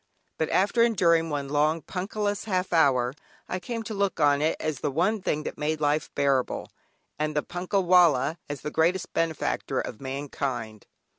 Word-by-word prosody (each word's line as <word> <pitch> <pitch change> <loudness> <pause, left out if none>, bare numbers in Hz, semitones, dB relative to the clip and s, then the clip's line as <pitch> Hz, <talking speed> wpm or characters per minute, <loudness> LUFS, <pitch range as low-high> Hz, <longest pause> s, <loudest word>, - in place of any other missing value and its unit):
But 160 - 0
after 205 +5 +2
enduring 170 -8 +3
one 145 -2 -2
long 150 +2 +1
Punkahless 205 +4 -3
half 185 -3 -1
hour, 130 -6 +3 0.3
I 185 - -3
came 230 +5 -4
to 220 - -5
look 200 -1 -1
on 145 -1 +4
it 155 +1 +2
as 155 -5 -2
the - - -1
one 185 +9 +1
thing 155 -3 -1
that - - -6
made 155 +1 -1
life 150 0 +1
bearable, 140 -3 0 0.5
and 155 0 -1
the 150 - +1
"Punkah 185 +3 -1
wallah" 170 -4 +4
as 145 -2 -5
the 150 - -4
greatest 170 +4 +1
benefactor 165 -2 -1
of 110 - -5
mankind. 130 -5 -4
160 Hz, 170 wpm, -26 LUFS, 145-185 Hz, 0.5 s, on